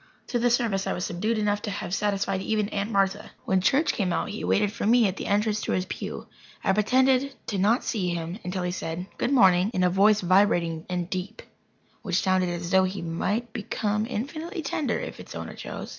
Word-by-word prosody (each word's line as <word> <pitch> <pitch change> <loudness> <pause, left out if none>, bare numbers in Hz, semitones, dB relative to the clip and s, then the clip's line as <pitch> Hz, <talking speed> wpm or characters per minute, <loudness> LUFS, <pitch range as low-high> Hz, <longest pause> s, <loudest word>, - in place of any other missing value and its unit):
Through 240 - -1
the 245 +1 +3
service 230 -5 +1
I - - 0
was 180 - -3
subdued 215 +6 -1
enough 205 -1 0
to 210 - -4
have 200 -3 -4
satisfied 195 -1 0
even 210 +1 0
Aunt 200 0 -2
Martha. 195 -1 0
When 190 -1 +2
church 285 - +3
came 190 -6 -1
out, 175 - -1
he 210 - -5
waited 205 0 +2
for 210 - -2
me 235 -1 +5
at 190 - -2
the - - -4
entrance 210 +1 +1
to - - -1
his 185 - 0
pew. - - -6 0.4
I 195 - +3
pretended 260 +6 +3 0.2
not 205 +6 +3
to - - -9
see 190 -7 0
him 170 +3 -4
until 180 0 -3
he 180 - -1
said 175 0 -4
"Good - - 0
morning," 190 -7 +5
in 185 - +2
a 180 - +3
voice 205 +3 +4
vibrating 175 -3 +2
and 180 -1 -2
deep, 190 +5 -5 0.6
which 190 -4 0
sounded 185 -1 +2
as 175 0 -4
though 190 -1 +5
it 185 -1 -4
might 205 +8 -2
become 215 -1 -1
infinitely 310 - -4
tender 285 0 -1
if - - -7
its - - -10
owner - - -6
chose. - - -7
200 Hz, 215 wpm, -26 LUFS, 185-220 Hz, 0.6 s, me